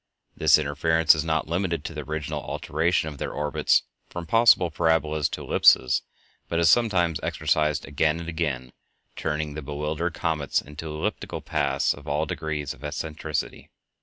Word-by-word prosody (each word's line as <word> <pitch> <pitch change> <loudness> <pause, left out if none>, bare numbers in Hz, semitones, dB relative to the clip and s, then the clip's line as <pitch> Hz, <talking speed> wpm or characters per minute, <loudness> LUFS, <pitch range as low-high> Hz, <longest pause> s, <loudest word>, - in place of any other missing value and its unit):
This 75 -1 +5
interference 80 +2 +3
is 75 -2 -1
not 80 -1 -1
limited 85 -2 -1
to - - -5
the 75 - -5
original 75 +1 -4
alteration 85 0 -1
of 75 -3 -7
their - - -3
orbits 75 0 +1 0.3
from 85 -1 -6
possible 110 -3 +5
parabolas 80 -2 +1
to - - -6
ellipses, 65 - +4 0.5
but 85 - -1
is 85 -1 +5
sometimes 95 -9 +2
exercised 75 -1 0
again 75 +3 0
and 85 - -7
again, 75 -7 -3 0.4
turning 75 0 -2
the 75 - -5
bewildered 75 +4 -3
comets 80 -4 0
into 75 +3 -8
elliptical 75 0 -4
paths 70 +1 0
of 75 0 -14
all 75 +2 0
degrees 75 -2 -4
of 65 - -17
eccentricity. 75 0 -4
80 Hz, 155 wpm, -25 LUFS, 75-80 Hz, 0.5 s, This